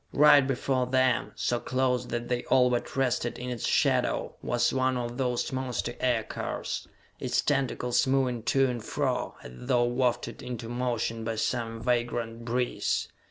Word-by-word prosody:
Right 150 Hz, 0 st, +7 dB
before 130 Hz, -1 st, 0 dB
them, 130 Hz, -1 st, +2 dB
so 110 Hz, +4 st, 0 dB
close 125 Hz, -1 st, 0 dB
that 120 Hz, 0 st, -3 dB
they 125 Hz, -1 st, -1 dB
all 125 Hz, -1 st, +4 dB
but 120 Hz, -, -2 dB
rested 125 Hz, -3 st, 0 dB
in 125 Hz, 0 st, -5 dB
its 120 Hz, -, -3 dB
shadow, -, -, +1 dB
was 120 Hz, 0 st, +1 dB
one 130 Hz, -1 st, +1 dB
of 120 Hz, -1 st, -3 dB
those 125 Hz, -2 st, 0 dB
monster 130 Hz, -2 st, -2 dB
aircars, 120 Hz, -3 st, -2 dB, 0.3 s
its -, -, 0 dB
tentacles 130 Hz, -3 st, +1 dB
moving 130 Hz, -3 st, +1 dB
to 135 Hz, 0 st, +3 dB
and 120 Hz, -3 st, -3 dB
fro -, -, -1 dB
as -, -, -9 dB
though 125 Hz, -, +1 dB
wafted 120 Hz, 0 st, -1 dB
into 120 Hz, -2 st, -6 dB
motion 120 Hz, -2 st, -2 dB
by 115 Hz, 0 st, -2 dB
some 115 Hz, 0 st, -2 dB
vagrant 120 Hz, -1 st, -1 dB
breeze. 125 Hz, +1 st, -1 dB
125 Hz, 155 wpm, -28 LUFS, 120-130 Hz, 0.3 s, Right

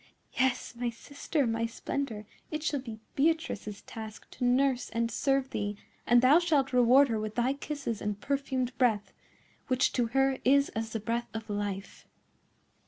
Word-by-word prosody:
"Yes, 260 Hz, -1 st, 0 dB
my 240 Hz, 0 st, -1 dB
sister, 285 Hz, +4 st, -2 dB
my 230 Hz, 0 st, 0 dB
splendour, 230 Hz, -2 st, -4 dB, 0.2 s
it 310 Hz, -1 st, -4 dB
shall 290 Hz, -3 st, 0 dB
be 230 Hz, -4 st, -8 dB, 0.2 s
Beatrice's 280 Hz, -9 st, 0 dB
task 220 Hz, -1 st, -9 dB
to -, -, -6 dB
nurse 250 Hz, +1 st, +2 dB
and 230 Hz, 0 st, -1 dB
serve 270 Hz, +2 st, +1 dB
thee; 205 Hz, 0 st, -2 dB, 0.3 s
and 240 Hz, 0 st, +5 dB
thou 285 Hz, +6 st, +7 dB
shalt 295 Hz, -7 st, +1 dB
reward 250 Hz, +3 st, +6 dB
her 225 Hz, -2 st, 0 dB
with 215 Hz, 0 st, -4 dB
thy 245 Hz, +2 st, +2 dB
kisses 280 Hz, -6 st, -4 dB
and 205 Hz, -1 st, -2 dB
perfumed 265 Hz, -2 st, -1 dB
breath, 220 Hz, -5 st, +2 dB, 0.5 s
which 255 Hz, 0 st, +2 dB
to 245 Hz, -2 st, +1 dB
her 270 Hz, +2 st, +2 dB
is 280 Hz, +2 st, +4 dB
as 225 Hz, +1 st, -4 dB
the 225 Hz, -, -1 dB
breath 235 Hz, +2 st, -2 dB
of 220 Hz, -1 st, -5 dB
life." 205 Hz, -1 st, -4 dB
245 Hz, 165 wpm, -30 LUFS, 225-275 Hz, 0.5 s, thou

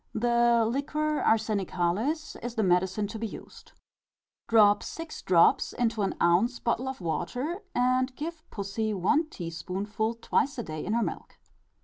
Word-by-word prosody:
The 235 Hz, 0 st, +3 dB
liquor 300 Hz, +4 st, -1 dB
arsenicalis 215 Hz, -, 0 dB
is 240 Hz, 0 st, -5 dB
the 220 Hz, -, +1 dB
medicine 190 Hz, +3 st, +2 dB
to 220 Hz, +2 st, -6 dB
be 225 Hz, -, -2 dB
used: -, -, -12 dB, 0.7 s
drop 210 Hz, -2 st, +5 dB
six 330 Hz, -1 st, -7 dB
drops 170 Hz, -2 st, +4 dB
into 225 Hz, -3 st, 0 dB
an 195 Hz, -, 0 dB
ounce 190 Hz, +9 st, +3 dB
bottle 240 Hz, +2 st, -1 dB
of 265 Hz, -6 st, -5 dB
water, 250 Hz, -, -3 dB
and 255 Hz, +1 st, +2 dB
give 320 Hz, +3 st, -5 dB
pussy 210 Hz, +1 st, -3 dB
one 295 Hz, -, +2 dB
teaspoonful 195 Hz, -, -3 dB
twice 265 Hz, +4 st, 0 dB
a 235 Hz, -, -2 dB
day 155 Hz, -4 st, -5 dB
in 210 Hz, -, -2 dB
her 235 Hz, 0 st, +2 dB
milk. -, -, -6 dB
225 Hz, 145 wpm, -28 LUFS, 195-255 Hz, 0.7 s, drop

